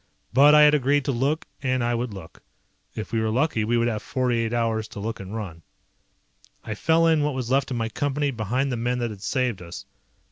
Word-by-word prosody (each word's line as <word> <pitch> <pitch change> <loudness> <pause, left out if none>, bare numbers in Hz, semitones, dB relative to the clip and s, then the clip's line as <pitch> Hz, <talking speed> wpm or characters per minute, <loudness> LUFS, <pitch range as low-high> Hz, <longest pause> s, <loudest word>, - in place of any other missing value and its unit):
But 145 +4 +7
I 150 - +8
had 150 0 +6
agreed 145 0 +2
to - - +1
look 140 +7 0 0.2
and 130 -2 0
I 120 0 +1
would 120 0 -2
look. 95 -5 -11 0.5
If 110 - -6
we 115 - +1
were 110 - 0
lucky 125 0 +1
we 120 +2 +1
would 115 0 +2
have 110 -3 -2
forty 125 -2 -1
eight 115 -1 -1
hours 115 -2 0
to 105 - -9
look 110 +2 -4
and 100 +2 -7
run. 95 -7 -6 1.0
I 110 - -4
fell 160 +9 +2
in 160 -2 +4
what 145 -2 0
was 130 -2 -3
left 135 +1 +2
of 125 - -3
my 115 -1 -1
Company 145 +3 -1
behind 125 +4 -1
the 120 - -2
men 120 +2 -1
that 120 -2 -2
had 100 -3 -10
saved 125 -5 -1
us. 85 -1 -9
120 Hz, 235 wpm, -24 LUFS, 110-140 Hz, 1.0 s, I